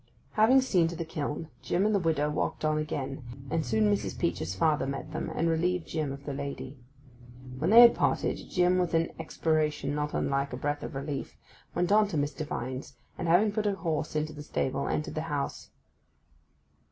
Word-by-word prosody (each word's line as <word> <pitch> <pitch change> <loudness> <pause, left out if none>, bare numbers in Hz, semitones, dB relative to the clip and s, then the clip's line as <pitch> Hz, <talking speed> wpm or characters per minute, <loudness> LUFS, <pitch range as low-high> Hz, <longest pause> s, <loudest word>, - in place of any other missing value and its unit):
Having 235 +5 +5
seen 185 -10 +3
to 170 - -5
the 165 - -4
kiln, 155 0 -4
Jim 185 +3 +1
and 215 - +2
the 200 - +3
widow 160 -4 +1
walked 150 +1 -2
on 155 0 +2
again, 140 -3 -3 0.3
and 160 - +1
soon 110 -5 +1
Mrs. 100 -2 -3
Peach's 85 +1 -1
father 150 +5 +2
met 140 +2 -5
them, 155 - -3
and 165 - +1
relieved 170 +2 +1
Jim 155 -4 -2
of 140 +1 -8
the 145 - -3
lady. 140 -1 -6 0.8
When 160 +5 +1
they 230 +3 +10
had 235 -1 +9
parted, - - +1
Jim, 180 0 +3
with 175 -2 0
an 165 0 +1
expiration 150 -3 0
not 150 0 -2
unlike 140 -1 0
a - - -3
breath 145 +2 -2
of - - -6
relief; 140 0 -4 0.4
went 175 +2 +1
on 210 0 +5
to 180 -6 -3
Mr. 145 +2 -1
Vine's, 130 -2 -5 0.2
and, - - -4
having 185 +6 +4
put 215 0 -1
the 205 -1 +1
horse 160 -5 -2
into 155 0 -1
the 150 - -8
stable, 140 -2 -2
entered 150 - -2
the 155 - -2
house. 145 -2 -3
155 Hz, 195 wpm, -29 LUFS, 140-175 Hz, 0.8 s, they